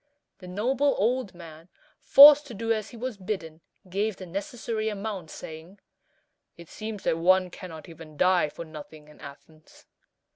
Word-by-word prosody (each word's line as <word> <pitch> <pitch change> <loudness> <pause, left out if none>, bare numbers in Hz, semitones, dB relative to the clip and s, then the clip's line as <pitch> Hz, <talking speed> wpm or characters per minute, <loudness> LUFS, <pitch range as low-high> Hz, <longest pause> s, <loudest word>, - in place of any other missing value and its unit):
The 180 - -12
noble 255 +9 0
old 225 -2 -1
man, 165 0 -13 0.3
forced 295 +1 +8
to 240 - -9
do 225 +2 0
as 215 -2 -4
he 240 - -12
was 250 -1 -5
bidden, 180 -5 -6 0.3
gave 200 +2 -2
the 185 - -9
necessary 215 +4 -4
amount, 200 -5 -6
saying, 160 +7 -10 0.8
"It 170 -1 -13
seems 215 -2 -7
that 165 - 0
one 185 +1 +3
cannot 165 -4 -10
even 160 -2 -13
die 180 -3 +3
for 170 - -9
nothing 155 -1 -12
in 150 - -18
Athens." 155 +2 -15
185 Hz, 155 wpm, -26 LUFS, 165-220 Hz, 0.8 s, forced